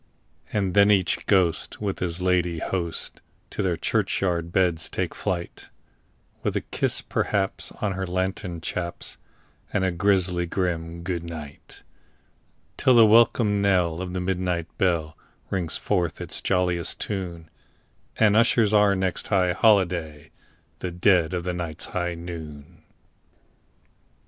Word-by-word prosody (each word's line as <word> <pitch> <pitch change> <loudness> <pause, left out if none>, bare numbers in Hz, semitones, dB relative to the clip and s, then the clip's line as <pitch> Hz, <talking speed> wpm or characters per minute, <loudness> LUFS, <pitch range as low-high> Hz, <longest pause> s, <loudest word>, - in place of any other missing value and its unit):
And 100 -4 0
then 100 +1 +6
each 95 -3 +2
ghost 95 -5 +1
with 100 -2 -3
his 90 0 -2
ladye 90 -2 +1
toast 85 -2 -3 0.3
to - - -3
their 90 -4 0
churchyard 85 0 0
beds 90 -3 +1
take - - -2
flight, 85 -2 -4 0.7
With - - -2
a - - 0
kiss, - - -1
perhaps, 95 -1 -1
on 105 - +1
her 95 0 -3
lantern 90 -2 -3
chaps, 85 +1 -4 0.5
and 100 - 0
a 95 - +1
grisly 90 -1 +1
grim 85 -2 -2
"good 85 -2 -3
night"; 80 -4 -9 0.9
Till 130 - +4
the 115 -1 +8
welcome 110 -2 +4
knell 90 -4 +2
of 90 -1 -5
the 90 - -2
midnight 90 -2 -2
bell 85 -4 +1 0.4
rings 85 -4 0
forth 90 -5 -1
its - - -3
jolliest 90 -3 0
tune, 85 -5 -4 0.7
And 105 -2 +4
ushers 115 -2 +4
our 105 -1 +5
next 95 -1 -2
high 90 -3 +2
holiday—the 85 -5 -1
dead 90 -2 +3
of 90 - -2
the 90 0 -2
night's 85 -3 -3
high 90 -1 -3
noon! 80 -2 -9
90 Hz, 130 wpm, -25 LUFS, 85-95 Hz, 0.9 s, the